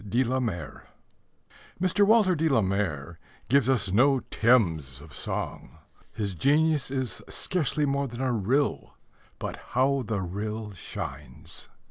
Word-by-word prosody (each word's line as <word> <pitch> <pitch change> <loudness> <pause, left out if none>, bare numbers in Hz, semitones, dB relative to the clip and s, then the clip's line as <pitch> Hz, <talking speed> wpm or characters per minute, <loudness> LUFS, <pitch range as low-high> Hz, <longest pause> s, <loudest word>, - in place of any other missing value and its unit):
DE 120 +6 +3
LA 130 +1 0
MARE 90 - -4 0.9
Mr. 185 +3 +3
Walter 210 -3 +5
de 160 -1 +1
la 130 -6 +4
Mare 85 -5 -2 0.3
gives 135 -1 +4
us 120 -8 +2
no 135 +6 +4
Thames 80 - +2
of 75 +1 -13
song. - - -4 0.3
His 105 -3 -3
genius 145 - +2
is 130 -3 -3
scarcely 155 -4 0
more 140 0 0
than 120 -1 -8
a 130 -1 +1
rill. 125 +6 0 0.4
But - - -5
how 135 +2 +1
the 105 -4 -2
rill 105 +3 -4
shines! 75 -5 -7
120 Hz, 135 wpm, -27 LUFS, 95-140 Hz, 0.9 s, Walter